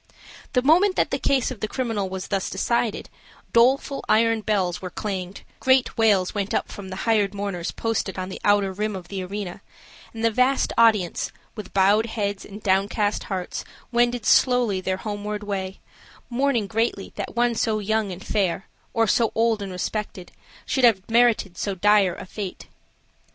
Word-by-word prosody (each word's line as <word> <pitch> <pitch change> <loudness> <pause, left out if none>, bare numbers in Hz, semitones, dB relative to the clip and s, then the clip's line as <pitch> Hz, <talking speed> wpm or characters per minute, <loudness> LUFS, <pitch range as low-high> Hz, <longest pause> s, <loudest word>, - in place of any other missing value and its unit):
The 250 -2 +2
moment 360 +7 +4
that - - +1
the - - -1
case 265 -2 +1
of 250 - -7
the 215 - -2
criminal 220 -5 -2
was 190 0 -6
thus 195 -2 -1
decided, 230 +3 -1 0.5
doleful 265 +4 +3
iron 225 +1 +3
bells 195 -5 0
were 185 - -5
clanged, 190 -1 -5 0.2
great 260 -1 +3
wails 205 -5 +3
went 200 -1 -2
up - - -1
from 195 -2 -8
the 185 - -5
hired 210 -3 +2
mourners 195 -4 -3
posted 225 -4 -2
on 185 0 -4
the - - -8
outer 205 -2 +3
rim 210 +1 -2
of 180 -2 -8
the 195 -2 -4
arena, 195 -1 -6 0.5
and 225 0 -3
the 230 - +4
vast 255 +4 +2
audience, 215 -7 +3 0.2
with 210 - -8
bowed 205 +4 +4
heads 205 -3 -3
and 205 +1 -11
downcast 200 +2 +1
hearts, 185 -3 -4 0.3
wended 240 -1 +1
slowly 245 -7 +3
their 185 0 -1
homeward 210 +1 -4
way, 195 -2 -4 0.5
mourning 250 -3 +1
greatly 220 -1 -2
that - - -5
one 240 0 +2
so 220 -1 0
young 215 -1 0
and 180 +1 -8
fair, 190 -3 0 0.3
or 225 - +4
so 225 +2 +2
old 225 -1 +2
and 195 -1 -5
respected, 185 0 -4 0.3
should 265 - -1
have 210 -6 +4
merited 225 -6 +3
so 200 -2 -2
dire 200 -1 +3
a - - -8
fate. 195 0 -6
210 Hz, 170 wpm, -24 LUFS, 190-230 Hz, 0.5 s, moment